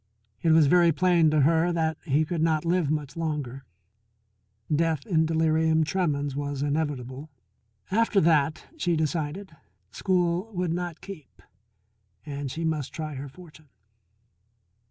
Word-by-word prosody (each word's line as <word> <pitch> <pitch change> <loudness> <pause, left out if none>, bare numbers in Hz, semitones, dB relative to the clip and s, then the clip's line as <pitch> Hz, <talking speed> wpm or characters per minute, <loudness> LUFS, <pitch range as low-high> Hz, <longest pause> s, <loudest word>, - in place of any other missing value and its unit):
It 165 - +1
was 160 -1 +6
very 170 +3 +5
plain 170 -1 +3
to 155 -1 +2
her 165 +4 +3
that 160 -1 0
he 150 0 +2
could 165 0 -3
not 160 -1 +1
live 170 -3 +1
much 150 -2 -3
longer; 145 -5 -4 1.1
death 160 -2 0
in 160 -6 +2
delirium 160 0 +2
tremens 145 -5 -1
was 145 -1 -3
inevitable. 145 -2 -3 0.6
After 225 0 +3
that, 155 -2 +2
she 175 - 0
decided, 160 +3 -3 0.4
school 180 +2 0
would 180 -2 -1
not 175 -2 -4
keep, 190 -8 -11 0.9
and 140 -2 -5
she 165 +5 -4
must 155 -4 -2
try 155 -2 -5
her 140 +1 -7
fortune. 155 -1 -16
160 Hz, 135 wpm, -26 LUFS, 145-170 Hz, 1.1 s, was